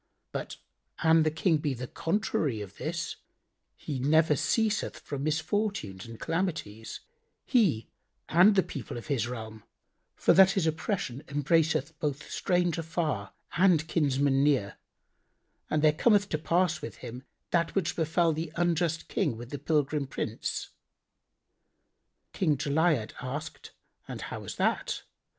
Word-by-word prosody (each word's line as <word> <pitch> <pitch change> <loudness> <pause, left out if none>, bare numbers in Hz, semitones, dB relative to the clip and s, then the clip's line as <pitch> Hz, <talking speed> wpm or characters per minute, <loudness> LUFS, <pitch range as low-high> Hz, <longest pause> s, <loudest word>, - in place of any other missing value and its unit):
But - - -5 0.5
an 160 0 +6
the 155 - +3
King 160 +1 +2
be 145 -2 -2
the 125 +1 -5
contrary 165 - -1
of 100 -3 -8
this, - - -3 0.6
he 140 -4 -5
never 150 +3 +4
ceaseth 215 - 0
from 140 -2 -5
misfortunes 160 - -1
and 115 -1 -10
calamities, 160 - -3 0.4
he 185 - +2 0.4
and 185 +6 +6
the 190 - +4
people 135 -3 -6
of 120 - -7
his 120 -3 0
realm; 110 -3 -7 0.5
for - - +4
that 190 0 +7
his 190 -5 +1
oppression 160 - -2
embraceth 150 +1 +1
both 145 -1 -2
stranger 175 -2 +1
far 155 - -2 0.2
and 170 -4 +4
kinsman 140 -3 +2
near 135 -9 +1 0.9
and 155 0 +1
there 155 -1 +6
cometh 205 +3 +3
to 155 - -1
pass 170 0 +1
with - - -6
him 125 +2 -7 0.3
that 170 -1 +1
which 190 -4 0
befel 165 +1 +2
the 160 0 -4
unjust 170 -1 0
King 115 - 0
with 120 +1 -9
the 145 - -4
pilgrim 145 -1 0
Prince." - - -3 1.6
King 155 -6 +1
Jali'ad 145 -4 +1
asked, 145 +3 -6 0.4
"And - - -6
how - - -5
was - - -7
that?" - - 0
155 Hz, 135 wpm, -29 LUFS, 135-170 Hz, 1.6 s, that